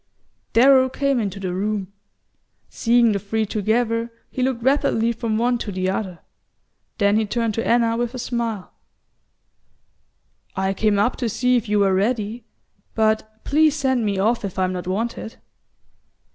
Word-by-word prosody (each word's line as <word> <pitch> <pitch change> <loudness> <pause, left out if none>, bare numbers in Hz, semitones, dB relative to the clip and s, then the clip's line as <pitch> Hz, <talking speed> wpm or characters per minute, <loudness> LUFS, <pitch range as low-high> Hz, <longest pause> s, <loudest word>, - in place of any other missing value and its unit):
Darrow 260 +2 +6
came 275 0 0
into 200 -3 -3
the 185 -2 -3
room. 200 0 -3 0.8
Seeing 235 -1 +3
the 200 - 0
three 220 +2 -1
together, 230 +3 0 0.2
he 255 - -4
looked 250 -2 -1
rapidly 235 -4 +2
from 225 -1 -2
one 240 +1 +1
to 210 - -4
the 185 0 -1
other; 190 -3 -4 0.8
then 205 -1 +3
he 220 - +1
turned 230 0 -1
to 225 - -2
Anna 230 -1 +3
with 240 +1 -2
a - - -4
smile. 235 -5 -3 1.8
"I 190 0 0
came 210 +1 +1
up 210 +5 +1
to 235 - -1
see 250 +3 +1
if 230 -3 -1
you 210 - +2
were 195 -2 +3
ready; 215 +3 -1 0.5
but 220 0 0
please 310 +1 +3
send 260 -5 0
me 200 -2 -1
off 220 +5 +1
if 195 -2 -5
I'm 185 -1 0
not 180 -1 -5
wanted." 225 +3 -3
225 Hz, 160 wpm, -22 LUFS, 200-240 Hz, 1.8 s, Darrow